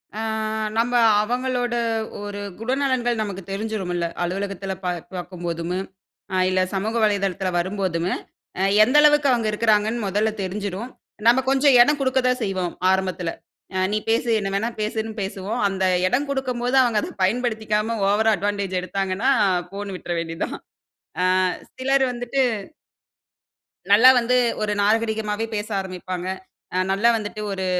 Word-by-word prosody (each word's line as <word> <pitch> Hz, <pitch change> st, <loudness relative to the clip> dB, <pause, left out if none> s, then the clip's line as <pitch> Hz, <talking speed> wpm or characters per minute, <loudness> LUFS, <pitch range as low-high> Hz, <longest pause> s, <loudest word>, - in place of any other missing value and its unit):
அ -, -, -4 dB, 0.6 s
நம்ம 235 Hz, +2 st, +1 dB, 0.3 s
அவங்களோட 245 Hz, +1 st, -1 dB, 0.5 s
ஒரு 205 Hz, 0 st, -6 dB, 0.2 s
குணநலன்கள் 250 Hz, -1 st, 0 dB
நமக்கு 200 Hz, -3 st, -4 dB
தெரிஞ்சிருமில்ல. 195 Hz, -4 st, -2 dB, 0.2 s
அலுவலகத்தில 195 Hz, +1 st, -3 dB
பா 180 Hz, -, 0 dB, 0.2 s
பார்க்கும்போதும், 175 Hz, -1 st, -4 dB, 0.5 s
அ -, -, +1 dB
இல்ல 185 Hz, 0 st, +2 dB
சமூக 210 Hz, +4 st, -2 dB
வலைதளத்தில 195 Hz, -2 st, +1 dB
வரும்போதும், 185 Hz, -2 st, -1 dB, 0.5 s
அ -, -, +2 dB, 0.2 s
எந்த 250 Hz, +6 st, +1 dB
அளவுக்கு 295 Hz, -1 st, +5 dB
அவங்க 235 Hz, -3 st, +1 dB
இருக்கிறாங்கன்னு 215 Hz, +1 st, +1 dB
முதல்ல 210 Hz, +3 st, +1 dB
தெரிஞ்சிரும். 200 Hz, +4 st, -4 dB, 0.4 s
நம்ம 240 Hz, +2 st, +6 dB
கொஞ்சம் 270 Hz, 0 st, +4 dB
இடம் 290 Hz, +4 st, +4 dB
குடுக்க 260 Hz, -1 st, +2 dB
தான் 250 Hz, 0 st, 0 dB
செய்வோம் 185 Hz, -4 st, -2 dB, 0.2 s
ஆரம்பத்தில. 185 Hz, -2 st, -1 dB, 0.5 s
அ -, -, +1 dB
நீ -, -, +2 dB
பேசு, 235 Hz, +1 st, +1 dB
என்ன 195 Hz, -1 st, -2 dB
வேணா 220 Hz, +4 st, 0 dB
பேசுன்னு 220 Hz, +1 st, -2 dB
பேசுவோம். 195 Hz, +4 st, -3 dB
அந்த 190 Hz, -1 st, -2 dB, 0.2 s
இடம் 265 Hz, +8 st, 0 dB
குடுக்கும்போது, 250 Hz, -2 st, -1 dB
அவுங்க 230 Hz, -4 st, +2 dB
அத -, -, -5 dB
பயன்படுத்திக்காம, 220 Hz, 0 st, 0 dB
ஓவரா 220 Hz, +2 st, +3 dB
அட்வான்டேஜ் 200 Hz, -1 st, -1 dB
எடுத்தாங்கன்னா, 195 Hz, +5 st, -1 dB, 0.4 s
போன்னு 200 Hz, -1 st, -5 dB
விட்ற 175 Hz, -, -7 dB
வேண்டியதான். 165 Hz, 0 st, -4 dB, 0.7 s
அ -, -, +3 dB, 0.5 s
சிலர் 270 Hz, +1 st, +2 dB
வந்துட்டு 245 Hz, +2 st, -1 dB, 1.5 s
நல்லா 225 Hz, +5 st, +8 dB
வந்து 245 Hz, +1 st, +1 dB, 0.3 s
ஒரு 210 Hz, -1 st, 0 dB
நாகரீகமாவே 220 Hz, 0 st, 0 dB
பேச 210 Hz, 0 st, -3 dB
ஆரம்பிப்பாங்க. 185 Hz, -1 st, -5 dB, 0.5 s
அ -, -, +1 dB
நல்லா 205 Hz, +5 st, +3 dB
வந்துட்டு 215 Hz, 0 st, -6 dB
ஒரு 190 Hz, -1 st, -3 dB
210 Hz, 130 wpm, -23 LUFS, 190-240 Hz, 1.5 s, நல்லா